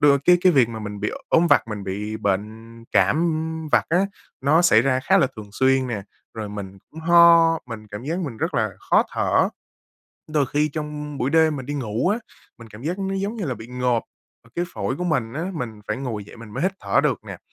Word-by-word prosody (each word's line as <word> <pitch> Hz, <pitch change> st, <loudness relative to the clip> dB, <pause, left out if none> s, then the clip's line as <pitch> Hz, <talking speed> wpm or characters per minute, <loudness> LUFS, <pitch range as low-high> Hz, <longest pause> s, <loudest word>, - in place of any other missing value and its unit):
đ -, -, +2 dB, 0.2 s
cái 180 Hz, 0 st, +6 dB
cái 180 Hz, 0 st, +5 dB
việc 130 Hz, -6 st, +4 dB
mà 115 Hz, -1 st, -6 dB
mình 105 Hz, -1 st, -6 dB
bị -, -, -1 dB, 0.2 s
ốm 170 Hz, +1 st, +4 dB
vặt, 115 Hz, -, +3 dB
mình 105 Hz, -2 st, -5 dB
bị 105 Hz, +3 st, -4 dB
bệnh 110 Hz, +3 st, -3 dB
cảm, 100 Hz, +7 st, +4 dB
ưm, 160 Hz, -1 st, -1 dB
vặt -, -, +3 dB
á, 170 Hz, -, +3 dB, 0.4 s
nó 150 Hz, +5 st, +4 dB
xảy 115 Hz, -11 st, +6 dB
ra 130 Hz, 0 st, +1 dB
khá -, -, +3 dB
là -, -, +4 dB
thường 105 Hz, -2 st, -9 dB
xuyên 130 Hz, +2 st, +2 dB
nè, 110 Hz, -5 st, -3 dB, 0.3 s
rồi 110 Hz, -2 st, -5 dB
mình 100 Hz, -2 st, -7 dB
cũng 160 Hz, -, -10 dB
ho, 170 Hz, 0 st, +6 dB
mình 110 Hz, -3 st, -8 dB
cảm 105 Hz, +4 st, -7 dB
giác 165 Hz, +5 st, -2 dB
mình 145 Hz, -11 st, -4 dB
rất 165 Hz, +8 st, -2 dB
là -, -, +1 dB, 0.2 s
khó -, -, +5 dB
thở. -, -, +2 dB, 0.8 s
Đôi 145 Hz, -3 st, +2 dB
khi 150 Hz, +3 st, +1 dB
trong 150 Hz, -1 st, -5 dB
buổi 130 Hz, -, 0 dB
đêm 160 Hz, -1 st, +4 dB
mình 130 Hz, -, -7 dB
đi 145 Hz, -, -3 dB
ngủ 120 Hz, +1 st, -1 dB
á, 210 Hz, +4 st, +1 dB, 0.4 s
mình 115 Hz, -1 st, -12 dB
cảm 105 Hz, +2 st, -12 dB
giác 170 Hz, +6 st, -2 dB
nó 195 Hz, 0 st, -2 dB
giống 200 Hz, +4 st, -2 dB
như 210 Hz, -, -3 dB
là 130 Hz, -, -2 dB
bị 110 Hz, -1 st, -10 dB
ngộp, 125 Hz, -1 st, 0 dB, 0.5 s
cái 175 Hz, -, 0 dB
phổi 110 Hz, +7 st, -2 dB
của 180 Hz, -, -3 dB
mình 135 Hz, -10 st, 0 dB
á, 165 Hz, +6 st, -3 dB
mình 115 Hz, -8 st, -5 dB
phải -, -, -1 dB
ngồi 120 Hz, -6 st, -4 dB
dậy 105 Hz, -, -14 dB
mình 115 Hz, -2 st, -11 dB
mới 125 Hz, +8 st, -4 dB
hít 185 Hz, +2 st, +1 dB
thở -, -, +2 dB
được -, -, 0 dB
nè. -, -, -8 dB
135 Hz, 235 wpm, -23 LUFS, 110-160 Hz, 0.8 s, cái